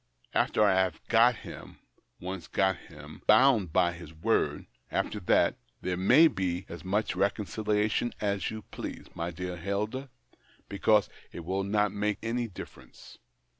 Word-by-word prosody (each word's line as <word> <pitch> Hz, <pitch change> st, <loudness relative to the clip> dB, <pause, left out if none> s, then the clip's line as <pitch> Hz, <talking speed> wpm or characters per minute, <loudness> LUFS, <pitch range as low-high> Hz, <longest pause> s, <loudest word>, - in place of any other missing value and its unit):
After 110 Hz, -, +2 dB
I 100 Hz, -2 st, +5 dB
have 95 Hz, -3 st, +1 dB
got 120 Hz, +2 st, +5 dB
him -, -, -10 dB, 0.2 s
— -, -, -43 dB
once 90 Hz, -1 st, -6 dB
got 95 Hz, -1 st, +2 dB
him -, -, -13 dB
— -, -, -37 dB
bound 130 Hz, -4 st, +6 dB
him -, -, -13 dB
by 85 Hz, +2 st, +2 dB
his 85 Hz, -2 st, -11 dB
word 80 Hz, -, 0 dB
— -, -, -45 dB
after -, -, -1 dB
that, -, -, +2 dB, 0.2 s
there 90 Hz, 0 st, -1 dB
may 125 Hz, -, +6 dB
be 95 Hz, -, -2 dB
as 85 Hz, -, -9 dB
much 95 Hz, +1 st, -1 dB
reconciliation 105 Hz, +3 st, 0 dB
as 100 Hz, -2 st, -1 dB
you 110 Hz, -1 st, -7 dB
please, -, -, -6 dB
my 85 Hz, +1 st, -3 dB
dear 90 Hz, +1 st, -5 dB
Hilda, 105 Hz, +9 st, -3 dB, 0.6 s
because 105 Hz, +1 st, +3 dB, 0.2 s
it 85 Hz, -, -8 dB
will 95 Hz, +2 st, -1 dB
not 105 Hz, 0 st, +1 dB
make 105 Hz, 0 st, -1 dB
any 120 Hz, +1 st, -1 dB
difference. 95 Hz, -, -12 dB
100 Hz, 165 wpm, -29 LUFS, 90-110 Hz, 0.6 s, bound